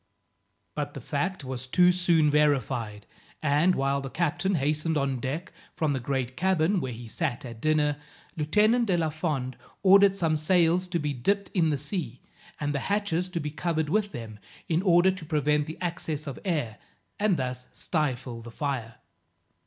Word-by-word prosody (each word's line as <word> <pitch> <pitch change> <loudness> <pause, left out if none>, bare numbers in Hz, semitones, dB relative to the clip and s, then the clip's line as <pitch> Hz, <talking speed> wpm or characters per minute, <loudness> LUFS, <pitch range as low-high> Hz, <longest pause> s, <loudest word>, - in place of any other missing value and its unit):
But - - -4
the - - -5
fact 190 -5 -2
was 130 -1 -6
too 180 +6 +5
soon 170 -4 +3
verified, 130 -8 +1 0.4
and, 150 +5 +3
while 140 +1 0
the 135 - -5
captain 175 +5 0
hastened 155 +2 0
on 135 -2 0
deck 150 +9 -4 0.2
from 155 -3 +1
the 135 - -1
great 130 -1 -2
cabin, 185 +2 +2
where 130 - -3
he 120 0 -8
sat 140 +1 -2
at 115 -2 -9
dinner, 150 -1 +2 0.4
Lieutenant 215 +10 +3
de 180 -3 +2
la 160 -2 +1
Fond 150 -5 -2 0.3
ordered 195 0 +7
some 165 -5 +1
sails 175 +2 +3
to 180 -1 -1
be 150 -2 -1
dipped 200 +11 0
in 170 -5 +3
the 145 - +1
sea, 145 - -4 0.4
and 145 -1 -1
the 140 - 0
hatches 195 -4 0
to 175 -2 -3
be 150 -1 -4
covered 160 0 -1
with 205 +3 +1
them 110 -3 -8 0.3
in 165 +1 +1
order 185 -1 +5
to 185 -3 -8
prevent 150 -1 +1
the 160 - -6
access 165 -4 -3
of 140 -3 -6
air, 150 - -2 0.4
and 205 -4 +2
thus 125 -1 -4
stifle 130 -7 -2
the 120 - -9
fire. 120 -3 -3
155 Hz, 175 wpm, -27 LUFS, 135-180 Hz, 0.4 s, ordered